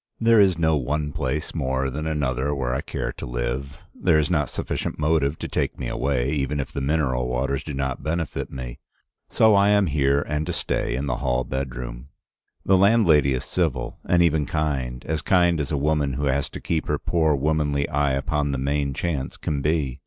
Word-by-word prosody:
There 115 -2 +5
is 95 -4 +4
no 80 -2 +2
one 75 +3 -2
place 75 +2 -3
more 65 -3 -1
than 75 +4 -4
another 70 -2 -1
where 60 -3 -1
I 65 - -1
care - - -4
to - - -7
live. - - -3 0.2
There - - +2
is 75 +3 +1
not 75 -6 +1
sufficient - - -3
motive 75 -1 +1
to - - -5
take - - -2
me - - -4
away, 65 -1 0
even 70 -1 -1
if 70 - -3
the 70 - -4
mineral 65 -4 0
waters 65 +3 -1
do 75 - -5
not 65 -1 -2
benefit 80 0 -3
me. 65 -1 -7 0.5
So 110 -1 +4
I 100 0 +5
am 105 -1 +4
here 70 -2 +2
and 75 +1 -2
to - - -2
stay - - -1
in 65 +3 -2
the 65 -4 -1
hall 65 0 0
bedroom. 65 -1 -5 0.6
The 95 - +5
landlady 90 - +4
is 65 - -4
civil, 85 -7 -2
and 85 -1 +3
even 80 -3 +2
kind, 65 -6 -2
as 80 0 -1
kind 85 -1 +3
as 75 0 -3
a 75 - +1
woman 75 -1 +1
who 70 +3 -2
has 70 +2 0
to - - -8
keep 80 -2 -2
her - - +1
poor 80 -3 +1
womanly 75 0 0
eye 70 0 +1
upon 70 +1 0
the - - -1
main 70 +1 -1
chance 75 -5 -3
can 70 -3 -2
be. 75 -3 0
70 Hz, 205 wpm, -24 LUFS, 65-80 Hz, 0.6 s, There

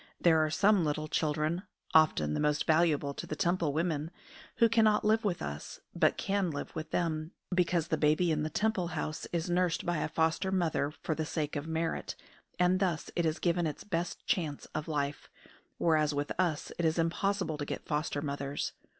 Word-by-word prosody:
There 160 -2 +5
are 155 - 0
some 200 +3 +4
little 155 0 -1
children 155 +3 0 0.3
often 150 - +4
the - - -1
most 150 0 +1
valuable 155 -3 +2
to - - -7
the 155 - -3
Temple 170 -2 +1
women 160 0 -1 0.5
who 230 - +5
cannot 220 -2 +3
live 220 +1 +3
with 190 -5 -1
us, 75 +1 -6
but - - +2
can 195 -2 0
live 145 -3 -5
with 155 0 -5
them, 160 -1 -1 0.2
because 175 -2 +1
the - - 0
baby 155 +3 +3
in 155 -1 +1
the 155 - -1
Temple 205 0 0
house 155 - -3
is 170 -1 -1
nursed 175 -1 +1
by 175 -1 0
a 150 - -1
foster 160 +4 +1
mother 165 -6 +1
for 160 - 0
the 160 - -2
sake 155 -1 -3
of 145 +1 -3
merit, 160 0 -2 0.4
and 180 +1 +3
thus 180 -5 -1
it 170 -2 +2
is 155 +1 0
given 175 -1 +1
its 150 - -5
best 175 -3 -3
chance 155 -6 -1
of 155 - -3
life; 145 -2 -2 0.5
whereas 155 -3 +2
with 145 0 -2
us 170 -5 0
it 170 - +1
is 160 +1 +2
impossible 170 -1 0
to - - -1
get - - -5
foster 150 -1 -1
mothers. 140 -1 -3
160 Hz, 195 wpm, -31 LUFS, 150-175 Hz, 0.5 s, There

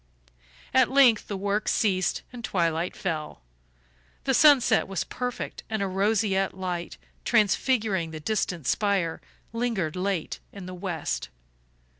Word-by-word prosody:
At - - +5
length 260 -5 +5
the 200 - -3
work 205 +2 -1
ceased 190 -4 +1
and 240 -1 -8
twilight 170 -3 0
fell. 155 -5 -4 0.8
The 270 - +1
sunset 260 -5 +5
was 195 -2 -2
perfect 250 -1 -5
and 220 -2 -1
a - - 0
roseate 195 0 +1
light, 180 -2 -4 0.3
transfiguring 215 -4 +2
the 160 -1 -7
distant 175 -3 -2
spire, 195 0 0 0.3
lingered 230 -9 -1
late 185 -2 -2
in 195 -2 -9
the 185 - -7
west. 175 - -3
195 Hz, 125 wpm, -26 LUFS, 175-220 Hz, 0.8 s, At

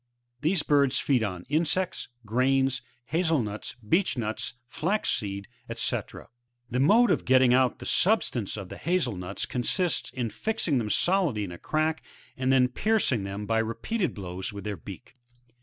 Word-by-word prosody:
These 160 +3 +1
birds 140 -2 +3
feed 130 -5 +2
on 90 -4 -3
insects, 170 +5 0 0.2
grains, 130 +3 +2 0.3
haze^ 160 -4 +2
nuts, 105 +1 -5
beech 170 - +2
nuts, 110 0 -3
flax 195 - 0
seed, 100 -3 -2 0.3
&c. - - +1 0.7
The 125 - 0
mode 220 - +5
f - - +3
of - - -20
getting 130 -1 +5
out 130 -1 +3
the - - -9
substance 135 - +1
of 95 -3 -7
the - - -8
hazel 170 - 0
nuts, 90 0 -4
consists 165 +8 -1
in 120 -4 -3
fixing 150 - 0
them 110 -3 -2
solidly 175 - +2
in 95 - -5
a 85 - -9
crack, 155 +1 0 0.3
and 130 0 0
then 130 -1 +5
piercing 130 - +1
them 100 +1 -5
by 115 +1 +1
repeated 170 - -2
blows 95 -1 -5
with 100 -1 -8
their 105 -1 -3
beak. 100 +6 -11
130 Hz, 165 wpm, -27 LUFS, 105-160 Hz, 0.7 s, mode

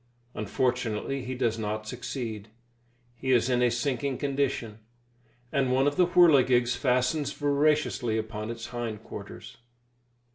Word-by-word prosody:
Unfortunately 125 +3 -1
he 130 +1 -4
does 115 -3 0
not 110 0 -3
succeed; 115 -3 -5 0.7
he 130 +2 -3
is 125 0 +3
in 125 0 +2
a 125 - +4
sinking 130 +2 -1
condition, 135 -6 -2 0.7
and 135 -3 +1
one 130 +1 +3
of 145 0 +1
the 180 +1 +4
whirligigs 130 -9 +5
fastens 130 +2 +1
voraciously 145 -5 +1
upon 110 0 -4
his 115 0 -6
hind 115 -3 -5
quarters. - - -9
125 Hz, 130 wpm, -28 LUFS, 115-140 Hz, 0.7 s, whirligigs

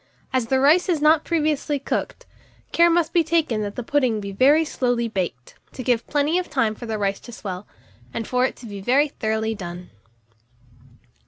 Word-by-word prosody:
As 255 -3 +1
the 265 +2 +2
rice 310 +8 +4
is 335 -4 +2
not 305 +1 +4
previously 305 -3 0
cooked, 275 - -4 0.5
care 340 0 +5
must 335 -1 +1
be 340 - +4
taken 315 -9 +1
that 205 -1 -4
the 245 - -4
pudding 255 -4 +1
be 200 -1 -6
very 285 +10 +4
slowly 245 -5 0
baked, 180 - -4 0.2
to 255 - -6
give 240 -2 0
plenty 295 +4 +1
of 365 - -5
time 230 -6 +1
for 235 +2 -9
the 220 -1 -2
rice 200 -1 -1
to 240 - -12
swell, 195 -3 -7 0.4
and 225 - -4
for 250 0 +1
it 260 - 0
to - - -13
be 200 -3 -7
very 275 +8 +3
thoroughly 220 -3 -2
done. 180 -3 -8
250 Hz, 190 wpm, -23 LUFS, 215-300 Hz, 0.5 s, care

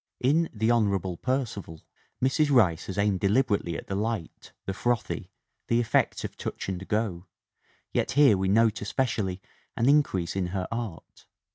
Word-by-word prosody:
"In 155 +6 +2
The 110 +1 +1
Honorable 100 -6 +1
Percival 110 - -3 0.4
Mrs. 145 +3 +3
Rice 95 - +3
has 95 - -5
aimed 100 -2 +2
deliberately 100 -5 +1
at - - -8
the - - -5
light, 105 -3 -3
the 95 - -2
frothy, 120 +3 -2 0.4
the 115 - +2
effect 115 -2 +1
of - - -5
touch - - -5
and 95 0 -4
go, 105 -5 -1 0.7
yet - - 0
here 140 -6 +6
we 95 0 -1
note 110 +2 +3
especially 100 -5 -1 0.3
an 115 - +2
increase 135 - +2
in 95 -2 0
her 90 0 -3
art. 115 -8 -6
105 Hz, 155 wpm, -27 LUFS, 95-120 Hz, 0.7 s, here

